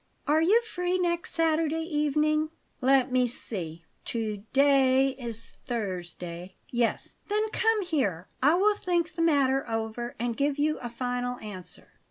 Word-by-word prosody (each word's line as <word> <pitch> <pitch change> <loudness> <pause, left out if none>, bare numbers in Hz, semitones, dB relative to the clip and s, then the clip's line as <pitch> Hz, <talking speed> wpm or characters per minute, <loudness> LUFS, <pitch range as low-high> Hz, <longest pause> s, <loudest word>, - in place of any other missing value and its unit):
"Are 305 +2 +3
you 425 +8 +4
free 360 -4 -1
next 345 -1 0
Saturday 325 -1 +1
evening?" 305 0 +1 0.3
"Let 265 0 +4
me 250 -1 +3
see 170 -9 -6 0.2
to 220 -3 -2
day 270 -1 +5
is 235 -4 -5
Thursday; 180 -5 -5 0.2
yes." 240 -1 -1
"Then 425 +1 +1
come 445 -2 +2
here. 215 - -1
I 295 +5 +5
will 410 +4 +4
think 345 -4 0
the 330 - -3
matter 275 -5 +3
over 225 +2 -3
and 235 0 -2
give 285 +2 0
you 305 +1 +1
a 240 - -5
final 245 +1 -2
answer." 195 -6 -5
270 Hz, 145 wpm, -28 LUFS, 230-325 Hz, 0.3 s, day